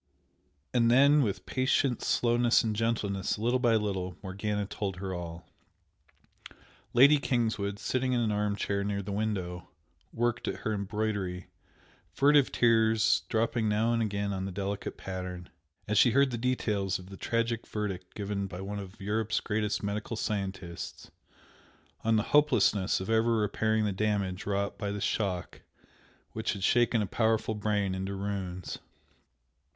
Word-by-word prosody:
And 115 -1 +4
then, 140 +4 +6
with 105 -7 -2
patient 130 -1 +1
slowness 120 0 +3
and 110 -2 -1
gentleness, 105 -4 -1
little 120 +4 +1
by 120 -3 +3
little, 95 -4 -2
Morgana 105 +2 -2
told 100 -1 -4
her 95 0 -5
all. 85 -1 -7 1.4
Lady 140 +4 +7
Kingswood, 110 -6 -1
sitting 130 +4 -1
in 125 - +2
an 115 -2 +1
arm 105 0 0
chair 100 -1 -1
near 100 0 -2
the 100 - -5
window, 95 -4 -3 0.4
worked 120 +1 -1
at - - -3
her 110 - -1
embroidery, 100 -3 -3 0.7
furtive 145 -1 +5
tears 110 -6 +3
dropping 115 0 +1
now 110 +3 +2
and 115 - +1
again 100 -2 -1
on 95 0 -3
the 95 - -4
delicate 100 +1 -4
pattern, 90 -1 -6 0.4
as 105 0 +3
she 125 - +6
heard 140 0 +4
the - - -2
details 105 -6 0
of 95 +1 -13
the - - -7
tragic 115 +3 -1
verdict 95 -4 -4
given 100 -1 -3
by 90 -2 -8
one 100 +2 -4
of 100 +2 -10
Europe's 110 +2 0
greatest 105 -1 -1
medical 105 +3 -3
scientists 95 -6 -4 0.9
on 115 0 +3
the 105 - +2
hopelessness 145 -10 +4
of 95 - -5
ever 115 +1 +3
repairing 110 +1 +1
the 105 - 0
damage 100 -2 -1
wrought 100 0 -1
by 105 -2 -2
the 100 +1 -3
shock 95 -3 -2 0.7
which 110 +1 -2
had 100 -3 -6
shaken 120 0 +3
a - - -1
powerful 110 +2 +1
brain 105 -2 0
into 95 +1 -3
ruins. 95 -2 -4
105 Hz, 150 wpm, -29 LUFS, 95-115 Hz, 1.4 s, Lady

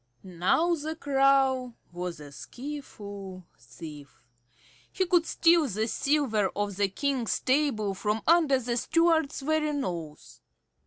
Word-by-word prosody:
Now 190 - +1
the 315 0 -3
Crow 270 -4 +2 0.2
was 175 -2 -5
a 145 -1 -11
skilful 200 - -8
thief. 145 +4 -12 0.7
He 380 - 0
could 350 -2 +2
steal 335 -2 +4
the 215 0 -2
silver 250 -7 +1
off 205 -2 -2
the 200 -1 +1
King's 260 +2 -1
table 255 -7 +1
from 210 +3 -2
under 320 -5 +4
the 240 -1 -2
steward's 320 0 +1
very 305 +1 0
nose. 170 - -5
255 Hz, 120 wpm, -28 LUFS, 195-300 Hz, 0.7 s, steal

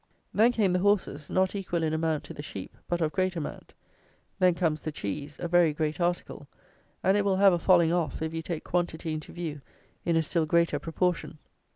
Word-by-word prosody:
Then 225 +4 +5
came 210 -6 +2
the 180 - +2
horses; 180 -7 +1
not 185 0 +2
equal 180 -4 -2
in 155 -1 0
amount 160 -1 0
to - - -9
the - - -7
sheep, 100 -10 -8
but 175 0 -1
of 155 -1 +1
great 185 0 0
amount. 160 -3 -6 0.7
Then 180 -2 +4
comes 160 -4 0
the 155 - -4
cheese, 145 +3 -5
a 175 - -2
very 170 -2 +4
great 155 +2 -2
article; 175 -4 -2 0.6
and 190 +1 +4
it 205 - +2
will 195 -1 +2
have 195 -1 +6
a 175 - +1
falling 170 -2 +4
off, 170 -6 -1
if 160 0 -3
you 165 - -2
take 165 -1 -4
quantity 170 -2 -1
into 155 -1 -6
view, 160 -4 -5 0.4
in 170 - +1
a 165 - +3
still 160 0 0
greater 170 -2 +2
proportion. 170 +1 -1
170 Hz, 210 wpm, -28 LUFS, 155-180 Hz, 0.7 s, have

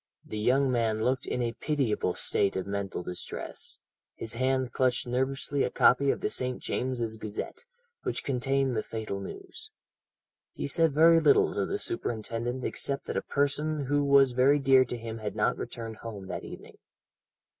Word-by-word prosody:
"The 110 - -5
young 130 +4 +3
man 110 -3 +1
looked 130 +2 0
in 125 - -1
a 120 - 0
pitiable 125 - 0
state 100 - +1
of 95 - -2
mental 100 -2 -3
distress; 90 0 -6 0.4
his 115 - -3
hand 130 +1 0
clutched 130 -1 +1
nervously 135 +3 -1
a - - +1
copy 140 +2 +4
of - - 0
the - - 0
St. 125 -1 -1
James's 120 -3 -2
Gazette, 110 - -6 0.4
which - - -3
contained 135 0 0
the 110 - +1
fatal 110 -3 -5
news. 390 - -9 0.8
He - - -4
said 165 -2 +2
very 165 +2 +7
little 410 - +4
to - - -1
the 400 - -1
superintendent 120 - -3
except 140 0 -2
that - - -4
a - - +1
person 145 +1 0
who 145 +2 +1
was 140 -2 +5
very 130 +4 +4
dear 135 -2 +5
to 120 0 -5
him 115 -1 -6
had 105 -1 -4
not - - +2
returned 115 -2 -6
home 105 -4 -7
that - - -5
evening. - - -10
130 Hz, 170 wpm, -29 LUFS, 115-140 Hz, 0.8 s, very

